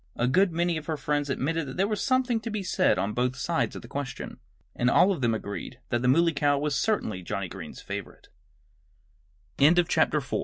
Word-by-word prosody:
A 120 - +1
good 180 +8 +3
many 170 0 0
of 155 - -7
her 160 -2 -1
friends 145 -1 -1
admitted 150 +3 -1
that 130 - -7
there 195 +2 +2
was 215 -1 -2
something 255 -3 +2
to 230 - -6
be 210 -2 -3
said 185 0 +2
on 105 +2 -1
both 125 +2 0
sides 170 +4 -1
of - - -8
the - - -10
question. 140 -3 -6 0.4
And 125 - +2
all 190 +9 +5
of 175 -8 -2
them 115 -2 +2
agreed 110 +4 -6
that 120 - 0
the 125 - +1
Muley 165 +6 +4
Cow 145 0 +2
was 145 +1 -1
certainly 140 - 0
Johnnie 95 +2 -3
Green's 90 -6 -9
favorite. - - -7 1.3
V 140 - +7
THE 175 +1 +4
FRIENDLY 150 -3 +2
SCA 135 - -2
150 Hz, 220 wpm, -27 LUFS, 125-175 Hz, 1.3 s, V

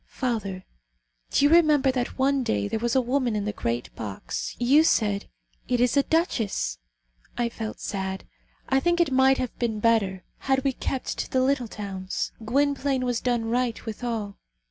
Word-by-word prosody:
Father, 205 -8 -3 0.6
do 285 - +3
you 290 - +5
remember 305 -5 +5
that 250 -2 -3
one 275 +1 +2
day 100 - 0
there 220 - -2
was 240 +2 0
a 260 - +5
woman 250 -2 0
in 205 -1 -1
the 210 - -2
great 120 -7 -3
box; 105 -3 -5
you 270 +6 +5
said: 205 -9 +1 0.4
'It 245 - +1
is 245 +1 +3
a 280 - +6
duchess.' 230 - 0 0.6
I 240 -1 +1
felt 225 -1 -6
sad. 190 -1 -4 0.4
I 265 - +3
think 345 +4 +1
it 335 -5 +3
might 265 0 +5
have 255 -2 -3
been 225 -3 -1
better 205 -5 +2 0.2
had 265 -1 +1
we 275 - +1
kept 260 +1 -3
to - - -3
the 260 - +2
little 260 -2 +1
towns. 195 -3 -4
Gwynplaine 275 +2 +1
has 245 -2 -1
done 240 -2 0
right, 240 0 -1
withal. 220 -2 -4
240 Hz, 175 wpm, -26 LUFS, 210-265 Hz, 0.6 s, a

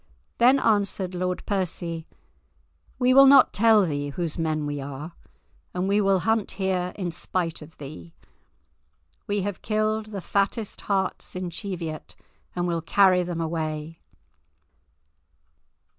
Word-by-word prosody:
Then 255 +3 +6
answered 200 -4 +1
Lord 180 0 -2
Percy, 175 -4 -3 0.9
"We 250 0 +3
will 275 +1 +8
not 275 +1 +7
tell 220 -1 +5
thee 145 -3 -2
whose 165 +2 -4
men 155 -2 -1
we 145 -1 -3
are, 140 +4 -7 0.6
and 180 +1 -1
we 205 +1 +3
will 195 -2 +2
hunt 225 0 +1
here 185 -2 -1
in 180 -4 -3
spite 170 -1 -2
of 155 +2 -13
thee. 85 - -10 1.1
We 205 0 0
have 200 -1 -4
killed 215 0 0
the 205 -2 -6
fattest 200 +3 -1
harts 190 -2 -1
in 180 -1 -4
Cheviot 170 -4 -6 0.4
and 175 0 -1
will 170 -1 -1
carry 185 +2 +4
them 175 -1 -4
away." 160 -1 -4
180 Hz, 130 wpm, -25 LUFS, 165-205 Hz, 1.1 s, will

